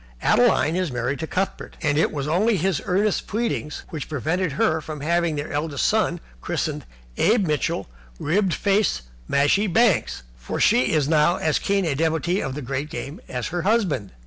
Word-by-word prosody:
Adeline 155 +3 +3
is 180 -4 -1
married 125 +3 -2
to 160 - -3
Cuthbert, 190 +4 -3
and 145 -2 +2
it 155 - +2
was 145 -1 -3
only 200 +7 +2
his 185 -2 0
earnest 200 +3 +1
pleading 220 -8 -2 0.2
which 160 -5 -6
prevented 160 +3 -1
her 160 +2 +1
from 155 -2 -7
having 170 +1 +1
their 145 +1 -4
eldest 145 -1 -1
son - - +1 0.2
christened - - -3 0.3
Abe 215 -2 +3
Mitchell 150 -4 -1 0.3
Ribbed 185 +4 +1
Faced 200 - +1 0.3
Mashie 145 +10 +3
Banks, 205 - +2
for - - -5
she 125 +1 +4
is 150 -3 +2
now 155 +2 +3
as 155 -4 0
keen 195 -1 0
a 155 - +1
devotee 165 +5 0
of 135 - -4
the 150 - -5
great 135 +4 -3
game 145 +1 -6
as 125 -2 -3
her 175 +1 -2
husband. 185 - 0
160 Hz, 175 wpm, -23 LUFS, 145-185 Hz, 0.3 s, she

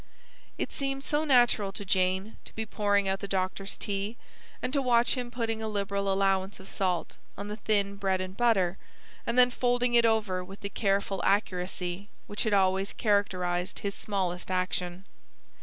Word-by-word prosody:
It - - -2
seemed 275 0 -3
so 295 +1 +1
natural 240 -7 +4
to 205 - -6
Jane 190 +2 +1
to - - -11
be 220 - -2
pouring 205 -1 +1
out 190 0 0
the 200 - -5
doctor's 195 +1 -2
tea, 200 +3 -3 0.4
and 255 - -3
to 280 - +3
watch 240 -2 +4
him 250 -2 -3
putting 230 -2 -2
a 220 - -2
liberal 200 -1 -1
allowance 195 0 +1
of 190 - -12
salt 180 -3 -1 0.2
on 200 +1 -5
the 210 - -3
thin 200 -2 0
bread 190 -2 +1
and 185 0 -5
butter, 195 -6 +2 0.5
and 235 - 0
then 250 0 +7
folding 245 0 +1
it 235 -1 +6
over 215 -5 +2
with 195 +2 -11
the 200 - -3
careful 195 -2 0
accuracy 185 -1 -1 0.2
which 205 - -3
had 215 - +1
always 190 0 +2
characterised 185 -4 0
his 200 -1 -2
smallest 185 -4 -2
action. 185 0 -1
200 Hz, 175 wpm, -29 LUFS, 190-220 Hz, 0.5 s, then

